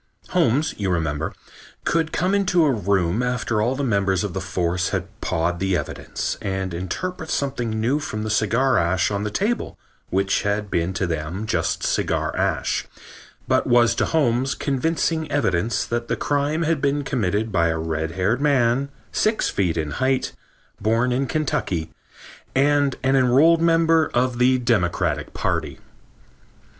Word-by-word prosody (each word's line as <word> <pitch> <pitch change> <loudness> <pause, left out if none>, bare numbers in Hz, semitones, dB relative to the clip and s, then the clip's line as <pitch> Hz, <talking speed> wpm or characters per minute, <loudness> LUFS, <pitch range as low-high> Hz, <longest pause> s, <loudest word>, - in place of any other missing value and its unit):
Holmes, 145 +7 +2
you 100 -2 -1
remember, 80 -3 -1 0.5
could 165 -1 0
come 185 +3 0
into 190 -4 +3
a 145 - +3
room 100 -2 +1
after 125 -3 -1
all 120 +4 +1
the 140 - -2
members 100 -6 +1
of 100 -4 -3
the 95 - -3
force 90 -1 -1
had - - -2 0.2
pawed 85 +1 -1
the 95 -1 +1
evidence - - -4
and 95 -2 -3
interpret 160 - -4
something 135 -4 -1
new 125 +7 +1
from 110 -8 -4
the 110 - -2
cigar 115 +5 +2
ash 90 +3 +1
on 100 0 -1
the 105 - -1
table 205 - -2 0.3
which 95 +1 +1
had 105 0 -2
been 85 +1 0
to 95 +2 -1
them 85 +4 -3
just - - -1
cigar - - 0
ash, - - -1 0.6
but - - +2
was 120 -1 +4
to - - 0
Holmes 135 -3 +1
convincing 160 +2 -1
evidence 110 -6 0
that 120 0 -3
the - - 0
crime 145 +3 0
had 160 -3 0
been 140 0 +1
committed 110 -4 -1
by 85 -3 +2
a 80 0 0
red 80 0 -3
haired 100 +8 0
man, 135 -2 +2 0.2
six 215 +1 +1
feet 90 -4 0
in 75 -2 -2
height, 130 0 0 0.5
born 115 +4 +2
in 130 +2 0
Kentucky 95 - -1 0.6
and 140 0 +3
an 135 +1 +3
enrolled 135 +6 +5
member 165 -1 +3
of 125 0 +1
the 130 +1 +4
Democratic 115 -8 0
Party. - - -2
120 Hz, 155 wpm, -22 LUFS, 95-140 Hz, 0.6 s, enrolled